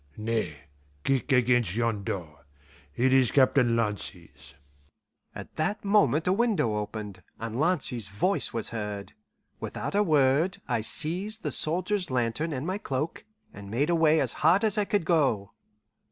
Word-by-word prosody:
"Nay, 110 -9 -2 0.4
kick 135 +1 0
against 120 -6 +3
yon 115 -3 0
door. 80 -7 -6 0.5
It 130 +2 +2
is 130 -3 +4
Captain 130 -3 +3
Lancy's." 105 -9 -5 0.8
At - - -10
that 180 +7 -1
moment 200 -6 +3
a 185 - +3
window 200 - +1
opened, 105 -1 -6 0.2
and 115 +1 -4
Lancy's 140 - +1
voice 105 - 0
was 115 -2 -2
heard. 105 -3 -5 0.5
Without - - -5
a 205 - +3
word 155 +2 +2
I 120 -4 0
seized 185 - -2
the - - -2
soldier's 180 +3 +1
lantern 125 +6 -1
and 135 0 -3
my 190 +3 -2
cloak, 150 +2 -4 0.3
and 100 0 -10
made 140 +10 0
away 160 -2 +4
as - - 0
hard 195 +5 +4
as 215 -2 +2
I 210 - +1
could 200 -4 0
go. 135 - +1
130 Hz, 150 wpm, -27 LUFS, 110-170 Hz, 0.8 s, is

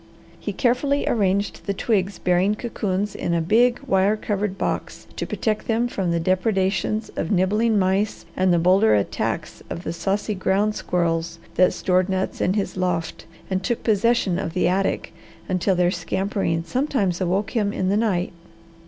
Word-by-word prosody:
He - - -4
carefully 275 +3 +1
arranged 200 -2 0
the 200 - -1
twigs 195 -3 0
bearing 180 +3 +2
cocoons 210 -3 -2
in 170 - -1
a - - +2
big, 235 +9 +3
wire 195 +3 +2
covered 205 -2 -2
box - - -3
to - - -3
protect 215 -1 -2
them 230 +1 +1
from 190 -6 -2
the 170 0 +1
depredations 190 +4 0
of 160 - -2
nibbling 210 +4 +2
mice 195 +2 0
and 185 0 +2
the 175 - +4
bolder 175 - +4
attacks 100 - -2
of 170 - -5
the 165 - -3
saucy 200 +4 -1
ground 200 +2 +1
squirrels 170 -3 -1 0.2
that 185 - +4
stored 185 -1 +1
nuts 190 0 -2
in 185 - +2
his 200 -2 -2
loft 180 -3 -2 0.2
and 190 -1 -1
took 240 -2 -1
possession 220 -4 +2
of 165 - -4
the 180 - +2
attic 190 +2 0 0.3
until 185 +1 +1
their 180 0 +2
scampering 180 -1 -1
sometimes 200 - -1
awoke 190 +4 0
him 210 -3 0
in 185 -2 -1
the 200 - +2
night. 195 -6 0
190 Hz, 165 wpm, -23 LUFS, 180-210 Hz, 0.3 s, the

